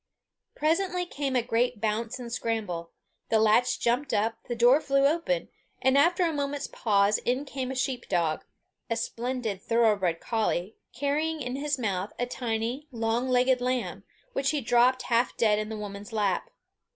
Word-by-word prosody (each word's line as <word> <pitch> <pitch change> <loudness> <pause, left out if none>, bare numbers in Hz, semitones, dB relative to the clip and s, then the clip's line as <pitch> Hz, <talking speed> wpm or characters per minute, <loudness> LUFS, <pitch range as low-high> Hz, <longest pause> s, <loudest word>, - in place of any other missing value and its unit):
Presently 360 +3 +1
came 280 -5 -3
a 245 - +2
great 240 -1 0
bounce 220 +2 -1
and 240 -2 -7
scramble; 205 -9 -2 0.4
the 225 - +4
latch 220 +3 +3
jumped 245 +4 +1
up, 225 +2 0
the 240 - -2
door 245 +5 +5
flew 275 -1 +2
open, 340 - +1 0.3
and 265 +1 +3
after 345 +5 +4
a 330 - 0
moment's 285 -1 -2
pause, 205 -1 +2
in 255 +4 -1
came 265 -2 -4
a 265 - -4
sheep 255 -1 -2
dog 170 -4 0 0.5
a 230 - +1
splendid 230 -3 -3
thorough 230 -1 +3
bred 175 -4 -1
collie, 215 -4 -1 0.2
carrying 300 +4 -1
in 250 +1 -3
his 285 +1 -1
mouth 200 -5 -2
a 245 - 0
tiny, 245 +3 -3
long 230 +2 -1
legged 255 0 +3
lamb, 250 0 -2 0.3
which 275 0 0
he 300 - +1
dropped 245 +1 +3
half 240 0 +1
dead 210 -2 +3
in 215 0 -3
the 220 - -5
woman's 205 +1 -7
lap. 210 - 0
245 Hz, 170 wpm, -28 LUFS, 220-275 Hz, 0.5 s, door